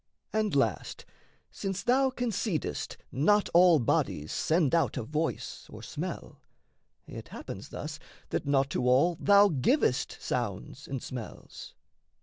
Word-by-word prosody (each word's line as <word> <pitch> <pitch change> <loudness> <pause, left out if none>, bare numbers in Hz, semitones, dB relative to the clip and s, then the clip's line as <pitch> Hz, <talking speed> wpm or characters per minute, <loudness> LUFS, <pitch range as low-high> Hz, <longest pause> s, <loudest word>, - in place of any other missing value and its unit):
And, 215 -6 0
last, 115 -8 -1 0.5
since 195 -1 -4
thou 265 +2 +3
concedest 220 - -2
not 205 +10 +3
all 175 -1 +7
bodies 80 - 0
Send 160 -3 +1
out 165 -6 +2
a 125 - -2
voice 155 +7 -3
or - - -11
smell, - - -6 0.6
it - - -9
happens - - -8
thus - - -6 0.3
That - - -2
not 135 -1 +2
to 125 - 0
all 140 +8 +4
thou 200 0 +6
givest 135 - +1
sounds 120 +3 -4
and 135 -3 -4
smells. 125 -4 -8
155 Hz, 130 wpm, -29 LUFS, 130-200 Hz, 0.6 s, all